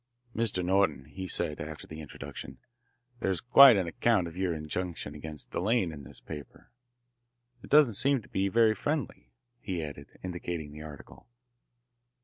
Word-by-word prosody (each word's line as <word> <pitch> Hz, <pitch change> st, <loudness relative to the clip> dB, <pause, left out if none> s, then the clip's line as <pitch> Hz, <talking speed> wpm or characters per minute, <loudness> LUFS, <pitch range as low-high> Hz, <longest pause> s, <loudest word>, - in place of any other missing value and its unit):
"Mr. 105 Hz, -6 st, 0 dB
Norton," 95 Hz, -8 st, +2 dB
he 95 Hz, +6 st, -7 dB
said, 75 Hz, -3 st, -1 dB
after 75 Hz, 0 st, -7 dB
the 80 Hz, 0 st, -8 dB
introduction, 65 Hz, -2 st, -9 dB, 0.6 s
"there's 95 Hz, -5 st, 0 dB
quite 125 Hz, -1 st, +8 dB
an 95 Hz, -, +1 dB
account 95 Hz, +2 st, +2 dB
of 85 Hz, -, -9 dB
your 95 Hz, -1 st, 0 dB
injunction 80 Hz, 0 st, -4 dB
against 75 Hz, 0 st, -9 dB
Delanne 100 Hz, -2 st, +1 dB
in 70 Hz, -3 st, -9 dB
this -, -, -12 dB
paper. 75 Hz, -3 st, -10 dB, 0.9 s
It -, -, -12 dB
doesn't 145 Hz, -6 st, +6 dB
seem 135 Hz, +6 st, +2 dB
to -, -, -18 dB
be 95 Hz, +1 st, 0 dB
very 110 Hz, +2 st, +4 dB
friendly," 125 Hz, -, -3 dB, 0.3 s
he 90 Hz, -7 st, -3 dB
added, 70 Hz, -1 st, -9 dB
indicating 85 Hz, -4 st, -4 dB
the 75 Hz, +1 st, -9 dB
article. 75 Hz, +6 st, -11 dB
90 Hz, 150 wpm, -30 LUFS, 75-105 Hz, 0.9 s, quite